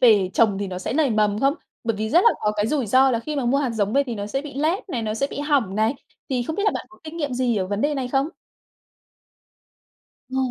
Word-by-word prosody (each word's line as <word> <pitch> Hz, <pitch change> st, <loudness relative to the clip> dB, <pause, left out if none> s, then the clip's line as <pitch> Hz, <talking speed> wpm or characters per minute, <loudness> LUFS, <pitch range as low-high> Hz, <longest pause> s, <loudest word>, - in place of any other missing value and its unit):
về 210 Hz, -7 st, +5 dB
trồng 205 Hz, -4 st, +3 dB
thì 200 Hz, -, -2 dB
nó 185 Hz, -1 st, -5 dB
sẽ 185 Hz, -, -3 dB
nảy 285 Hz, -2 st, +2 dB
mầm 210 Hz, -1 st, +1 dB
không? 275 Hz, +1 st, +3 dB, 0.3 s
Bởi 230 Hz, -2 st, 0 dB
vì 220 Hz, +1 st, -2 dB
rất 340 Hz, +4 st, +6 dB
là 465 Hz, -, +8 dB
có 210 Hz, -, +1 dB
cái 205 Hz, -, +1 dB
rủi 265 Hz, -1 st, 0 dB
ro 260 Hz, +5 st, +5 dB
là 230 Hz, -, +1 dB
khi 300 Hz, +4 st, -4 dB
mà 270 Hz, -, -1 dB
mua 265 Hz, +4 st, +2 dB
hạt 270 Hz, -4 st, 0 dB
giống 210 Hz, -2 st, -1 dB
về 280 Hz, +2 st, +4 dB
thì 240 Hz, -, -3 dB
nó 205 Hz, -1 st, -4 dB
sẽ 270 Hz, +6 st, -2 dB
bị 290 Hz, -2 st, -9 dB
lép 330 Hz, +7 st, 0 dB
này, 245 Hz, -9 st, -2 dB
nó 215 Hz, -1 st, -2 dB
sẽ 250 Hz, +5 st, 0 dB
bị -, -, -5 dB
hỏng 280 Hz, -10 st, +1 dB
này, 220 Hz, +5 st, +2 dB, 0.4 s
thì 250 Hz, -2 st, +1 dB
không 315 Hz, +6 st, -4 dB
biết 405 Hz, -, 0 dB
là -, -, +5 dB
bạn -, -, -4 dB
có 360 Hz, -, -19 dB
kinh 315 Hz, +1 st, -8 dB
nghiệm 290 Hz, -5 st, -2 dB
gì 245 Hz, -3 st, +1 dB
ở 185 Hz, -, 0 dB
vấn 205 Hz, +2 st, -2 dB
đề 295 Hz, +3 st, +1 dB
này 260 Hz, -2 st, -2 dB
không? 270 Hz, +3 st, +1 dB, 2.0 s
Ờ. 260 Hz, -, -3 dB
250 Hz, 280 wpm, -23 LUFS, 215-285 Hz, 2.0 s, là